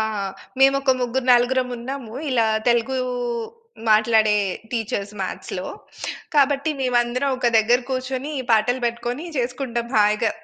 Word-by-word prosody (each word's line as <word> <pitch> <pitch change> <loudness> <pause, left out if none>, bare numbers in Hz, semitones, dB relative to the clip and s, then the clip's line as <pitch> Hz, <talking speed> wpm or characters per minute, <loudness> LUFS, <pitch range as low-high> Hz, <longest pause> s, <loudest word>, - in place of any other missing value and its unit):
ఆ! - - +2 0.6
మేము 270 0 +6
ఒక 270 - +2
ముగ్గురు, 250 +1 -1
నలుగురం 250 +1 +3
ఉన్నాము. 240 -1 -6 0.2
ఇలా 230 -3 +3 0.2
తెలుగు 240 +2 +2 0.9
మాట్లాడే 215 0 +4 0.3
టీచర్స్ 210 -3 -3
మ్యాథ్స్‌లో. 190 - -4 0.7
కాబట్టి 285 +1 +3
మేమందరం 250 +2 +1
ఒక 245 -2 +2
దగ్గర 235 +3 +3
కూర్చొని, 260 +2 -3
ఈ - - -4
పాటలు 230 +3 +3
పెట్టుకొని 240 +6 -3
చేసుకుంటాం 240 -1 -2
హాయిగా. 210 0 +3
245 Hz, 120 wpm, -22 LUFS, 230-260 Hz, 0.9 s, మేము